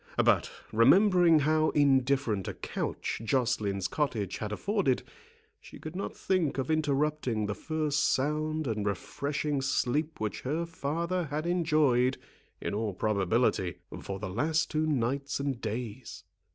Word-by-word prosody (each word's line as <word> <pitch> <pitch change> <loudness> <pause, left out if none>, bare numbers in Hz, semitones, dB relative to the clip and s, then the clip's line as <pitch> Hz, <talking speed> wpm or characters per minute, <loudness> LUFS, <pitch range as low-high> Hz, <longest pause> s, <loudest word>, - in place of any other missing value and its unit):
But, - - +3 0.2
remembering 170 - +5
how 155 +2 +3
indifferent 135 - +2
a - - -4
couch - - -4
Joceline's 110 -6 0
cottage 115 - -2
had 105 -1 -4
afforded, 190 - 0 0.6
she - - -13
could 155 +2 -8
not 195 - -4
think 180 -8 0
of 135 +4 -1
interrupting 150 -6 0
the 105 - -2
first 150 +1 -1
sound 155 +3 0
and 110 -4 -1
refreshing 140 +8 -2
sleep 145 +4 0
which 110 -1 -3
her 155 +6 -1
father 170 +3 -2
had 150 +2 -3
enjoyed, 150 -8 +2 0.4
in - - -3
all 105 -2 -2
probability, 100 -2 +1 0.3
for 95 - -5
the 100 - -5
last 155 - 0
two 155 0 +1
nights 140 0 -1
and 140 -3 -2
days. 115 +2 -5
140 Hz, 135 wpm, -29 LUFS, 115-155 Hz, 0.6 s, remembering